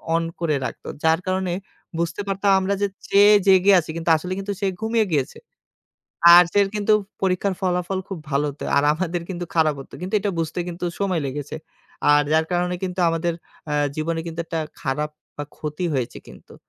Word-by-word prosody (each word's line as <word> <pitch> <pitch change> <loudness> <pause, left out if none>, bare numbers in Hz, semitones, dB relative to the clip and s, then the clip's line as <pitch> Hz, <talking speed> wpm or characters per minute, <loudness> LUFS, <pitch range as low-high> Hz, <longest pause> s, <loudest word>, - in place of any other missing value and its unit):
On 165 - +1 0.2
করে 160 -4 0
রাখত। - - -7 0.2
যার 160 +1 +3
কারণে 185 -1 0 0.5
বুঝতে 170 +3 -2
পারতাম, 195 0 +1
আমরা 190 +1 0
যে 200 - +3 0.2
চেয়ে 205 +1 +6
জেগে 190 +1 +6
আছি 160 - -7
কিন্তু 165 0 -2
আসলে 180 +4 -5
কিন্তু 200 +1 -3
সে 195 - +1
ঘুমিয়ে 220 0 +1
গিয়েছে। 140 -1 -1 1.0
আর 175 - +10
সের 200 -1 +4
কিন্তু 210 +1 +1 0.3
পরীক্ষার 190 +1 +1
ফলাফল 180 0 -1
খুব 190 -4 -5
ভালো 140 +2 +1
হত। 140 - -16 0.2
আর 140 - +4
আমাদের 170 +1 -2
কিন্তু 175 -2 -4
খারাপ 155 -2 +3
হত। - - -12
কিন্তু 185 +4 -4
এটা 200 0 -1
কিন্তু 170 - -6
বুঝতে 165 +2 -3 0.4
সময় 185 -5 0
লেগেছে। 145 +3 -5 0.6
আর 145 0 +5
যার 160 0 +3
কারণে 180 0 0
কিন্তু 185 0 -4
আমাদের 165 +1 0 0.4
আ - - 0 0.2
জীবনে 165 +1 -1
কিন্তু 165 0 -5
একটা 165 - -3 0.2
খারাপ 150 +3 -2 0.3
বা 145 - -4
ক্ষতি 150 +4 -4
হয়েছে 125 -3 -2
কিন্তু। - - -15
175 Hz, 185 wpm, -22 LUFS, 160-190 Hz, 1.0 s, আর